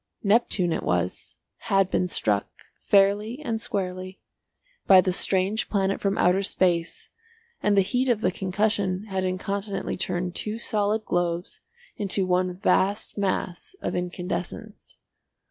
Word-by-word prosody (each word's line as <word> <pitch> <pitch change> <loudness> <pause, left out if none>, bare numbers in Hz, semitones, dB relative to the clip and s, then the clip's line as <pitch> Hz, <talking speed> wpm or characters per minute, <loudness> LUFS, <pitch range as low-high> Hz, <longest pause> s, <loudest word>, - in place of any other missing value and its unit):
Neptune 200 -5 +2
it - - -2
was, 90 0 -2 0.3
had 195 -1 +3
been 180 - +1
struck, 105 - 0 0.3
fairly 205 +5 +2
and 225 -6 -2
squarely, 185 -1 -4 0.7
by 190 -1 +9
the 185 0 +2
strange 195 +4 +1
planet 195 -1 0
from 200 0 0
outer 180 +2 +3
space 175 -3 0 0.5
and 205 -1 +2
the - - +7
heat 250 +6 0
of 230 -3 +2
the 185 - +2
concussion 195 0 0
had 190 -1 -1
incontinently 195 +2 -3
turned 180 -1 -2
two 215 +3 -3
solid 215 -1 -1
globes 175 0 -2 0.4
into 200 -3 +1
one 180 0 0
vast 195 +2 +1
mass 190 - -3
of - - -3
incandescence. 180 +3 -5
190 Hz, 130 wpm, -25 LUFS, 180-205 Hz, 0.7 s, by